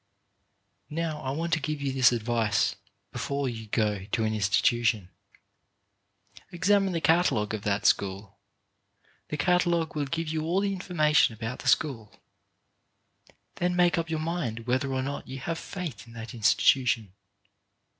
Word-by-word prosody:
Now, 160 Hz, -1 st, -3 dB
I 130 Hz, -, -4 dB
want 165 Hz, +5 st, -2 dB
to 165 Hz, -, +3 dB
give 155 Hz, 0 st, -3 dB
you 140 Hz, -1 st, -2 dB
this 130 Hz, -2 st, +5 dB
advice. 115 Hz, -3 st, +1 dB, 0.4 s
Before 140 Hz, -1 st, -2 dB
you 110 Hz, -3 st, -5 dB
go 105 Hz, -3 st, 0 dB
to 110 Hz, +2 st, -1 dB
an 110 Hz, 0 st, 0 dB
institution 110 Hz, 0 st, +1 dB, 1.4 s
examine 195 Hz, +2 st, +2 dB
the 165 Hz, -, 0 dB
catalogue 160 Hz, -12 st, +2 dB
of 110 Hz, -, -3 dB
that 100 Hz, 0 st, 0 dB
school. 100 Hz, +1 st, 0 dB, 0.9 s
The 150 Hz, -, -4 dB
catalogue 175 Hz, -2 st, +1 dB
will 145 Hz, -1 st, -1 dB
give 165 Hz, +4 st, -3 dB
you 155 Hz, 0 st, -2 dB
all 170 Hz, +4 st, 0 dB
the 200 Hz, -1 st, 0 dB
information 155 Hz, -, +2 dB
about 115 Hz, +3 st, -5 dB
the -, -, -7 dB
school. 120 Hz, -9 st, 0 dB, 1.4 s
Then 180 Hz, 0 st, 0 dB
make 175 Hz, -1 st, +3 dB
up 165 Hz, 0 st, -3 dB
your 160 Hz, -, -1 dB
mind 155 Hz, -9 st, -3 dB
whether 130 Hz, +2 st, 0 dB
or 130 Hz, 0 st, -1 dB
not 140 Hz, +1 st, -5 dB
you 135 Hz, -, -6 dB
have 165 Hz, +5 st, -4 dB
faith 150 Hz, -, -6 dB
in 115 Hz, -, -14 dB
that 115 Hz, +2 st, -8 dB
institution. 115 Hz, -1 st, +2 dB
135 Hz, 150 wpm, -27 LUFS, 110-165 Hz, 1.4 s, this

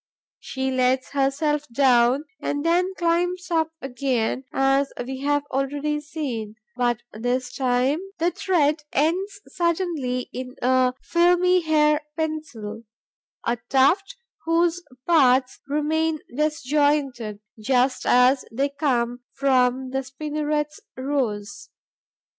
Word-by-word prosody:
She 265 Hz, 0 st, -3 dB
lets 255 Hz, 0 st, +1 dB
herself 285 Hz, +2 st, 0 dB
down 255 Hz, +1 st, +3 dB, 0.2 s
and 290 Hz, +1 st, -2 dB
then 360 Hz, +3 st, +2 dB
climbs 355 Hz, +1 st, 0 dB
up 320 Hz, -1 st, +1 dB
again, 260 Hz, -1 st, -1 dB
as 270 Hz, +1 st, +2 dB
we 265 Hz, +1 st, -5 dB
have 290 Hz, +1 st, +1 dB
already 285 Hz, +3 st, -1 dB
seen; 255 Hz, -8 st, -5 dB, 0.2 s
but, 240 Hz, -2 st, 0 dB
this 245 Hz, +3 st, -2 dB
time, 260 Hz, +3 st, +1 dB, 0.2 s
the 345 Hz, +1 st, +1 dB
thread 310 Hz, -6 st, +1 dB
ends 365 Hz, +8 st, 0 dB
suddenly 335 Hz, -8 st, -1 dB
in 255 Hz, 0 st, -6 dB
a 255 Hz, 0 st, +2 dB
filmy 355 Hz, +1 st, +3 dB
hair 300 Hz, -1 st, +3 dB, 0.2 s
pencil, 305 Hz, -10 st, -4 dB, 0.6 s
a 235 Hz, +1 st, +1 dB
tuft, 285 Hz, -, +3 dB, 0.3 s
whose 335 Hz, +1 st, +2 dB, 0.2 s
parts 260 Hz, -6 st, +3 dB
remain 310 Hz, +2 st, 0 dB, 0.2 s
disjoined, 285 Hz, -6 st, 0 dB, 0.2 s
just 255 Hz, +3 st, +1 dB
as 250 Hz, +2 st, +5 dB
they 275 Hz, +5 st, 0 dB
come 250 Hz, -4 st, 0 dB
from 260 Hz, -1 st, +1 dB
the 265 Hz, -, 0 dB
spinneret's 295 Hz, +2 st, -3 dB, 0.2 s
rose. 215 Hz, -7 st, -3 dB
280 Hz, 105 wpm, -24 LUFS, 255-310 Hz, 0.6 s, as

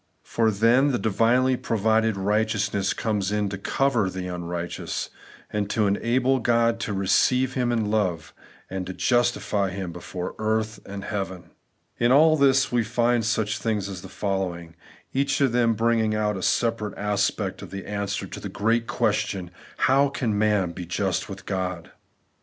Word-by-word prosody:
For 115 Hz, -1 st, +1 dB
then 115 Hz, +7 st, +3 dB
the 125 Hz, -, +1 dB
divinely 120 Hz, +4 st, +2 dB
provided 110 Hz, -2 st, +1 dB
righteousness 105 Hz, 0 st, 0 dB
comes 105 Hz, -3 st, -1 dB
in 105 Hz, -1 st, 0 dB
to 100 Hz, -, -4 dB
cover 120 Hz, -3 st, +1 dB
the 95 Hz, 0 st, -5 dB
xmrighteous, 85 Hz, -1 st, -4 dB, 0.4 s
and 105 Hz, -1 st, -1 dB
to 110 Hz, 0 st, +1 dB
enable 125 Hz, +6 st, +1 dB
God 115 Hz, -1 st, +2 dB
to 115 Hz, -, -3 dB
receive 110 Hz, +7 st, +2 dB
him 125 Hz, -2 st, 0 dB
in 110 Hz, -3 st, 0 dB
love, 90 Hz, -7 st, -1 dB, 0.3 s
and 95 Hz, 0 st, -5 dB
justify 120 Hz, -5 st, +1 dB
him 95 Hz, -1 st, -5 dB
before 90 Hz, +1 st, -6 dB
earth 110 Hz, 0 st, -1 dB
and 100 Hz, 0 st, -6 dB
heaven. 95 Hz, -4 st, -5 dB, 0.5 s
In 120 Hz, +1 st, +3 dB
all 155 Hz, +4 st, +6 dB
this 135 Hz, -2 st, +3 dB
we 120 Hz, -1 st, +2 dB
find 120 Hz, +1 st, +1 dB
such 110 Hz, 0 st, 0 dB
things 105 Hz, -4 st, -1 dB
as 95 Hz, -3 st, -7 dB
the 95 Hz, -, -10 dB
following; 90 Hz, -4 st, -3 dB, 0.4 s
each 140 Hz, +1 st, +1 dB
of 135 Hz, -4 st, +3 dB
them 115 Hz, -1 st, +2 dB
bringing 115 Hz, -1 st, +1 dB
out 105 Hz, -1 st, 0 dB
a 95 Hz, -, -5 dB
separate 115 Hz, 0 st, 0 dB
aspect 105 Hz, -1 st, -1 dB
of -, -, -9 dB
the 100 Hz, 0 st, -7 dB
answer 100 Hz, -1 st, -3 dB
to -, -, -8 dB
the -, -, -6 dB
great 115 Hz, +2 st, 0 dB
question, 90 Hz, -2 st, -1 dB
' -, -, -22 dB
How 140 Hz, +2 st, +4 dB
can 120 Hz, -6 st, -1 dB
man 105 Hz, -4 st, +2 dB
be 85 Hz, 0 st, -7 dB
just 95 Hz, +3 st, -1 dB
with 95 Hz, 0 st, -8 dB
God? 95 Hz, -3 st, -3 dB
105 Hz, 165 wpm, -25 LUFS, 95-115 Hz, 0.5 s, all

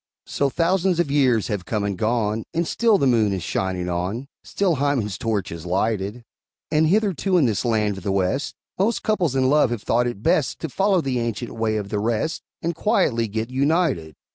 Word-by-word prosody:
So 140 Hz, -, 0 dB
thousands 175 Hz, +3 st, +1 dB
of 160 Hz, -5 st, +1 dB
years 130 Hz, -7 st, +3 dB
have 100 Hz, -4 st, -2 dB
come 105 Hz, 0 st, -1 dB
and 100 Hz, -1 st, -1 dB
gone, 110 Hz, +1 st, 0 dB
And 170 Hz, 0 st, 0 dB
still 225 Hz, +1 st, +3 dB
the 140 Hz, -, +1 dB
moon 115 Hz, -5 st, +3 dB
is 95 Hz, -3 st, -3 dB
shining 90 Hz, 0 st, -2 dB
on, 90 Hz, +8 st, -2 dB, 0.2 s
Still 185 Hz, -6 st, 0 dB
Hymen's 130 Hz, -8 st, 0 dB
torch 105 Hz, -3 st, -2 dB
is 85 Hz, -1 st, -7 dB
lighted; 100 Hz, +4 st, -1 dB, 0.5 s
And 155 Hz, +1 st, +3 dB
hitherto, 195 Hz, -1 st, +2 dB
in 160 Hz, -, +4 dB
this 110 Hz, -5 st, 0 dB
land 105 Hz, -4 st, 0 dB
of -, -, -15 dB
the 100 Hz, -, -1 dB
West, 95 Hz, +9 st, -1 dB, 0.2 s
Most 220 Hz, +5 st, +1 dB
couples 180 Hz, -, +1 dB
in 130 Hz, -1 st, +3 dB
love 145 Hz, -1 st, +4 dB
have 120 Hz, -3 st, -4 dB
thought 120 Hz, +1 st, +2 dB
it 110 Hz, -4 st, -5 dB
best 140 Hz, -6 st, +2 dB
To 160 Hz, -, -3 dB
follow 195 Hz, +4 st, +2 dB
the 130 Hz, -4 st, -1 dB
ancient 115 Hz, 0 st, -3 dB
way 110 Hz, -1 st, -1 dB
of 100 Hz, -2 st, -4 dB
the 105 Hz, -1 st, -1 dB
rest, 115 Hz, +8 st, -1 dB, 0.2 s
And 170 Hz, +1 st, 0 dB
quietly 145 Hz, -, +1 dB
get 110 Hz, +3 st, -4 dB
united. 140 Hz, -, 0 dB
120 Hz, 200 wpm, -23 LUFS, 105-160 Hz, 0.5 s, in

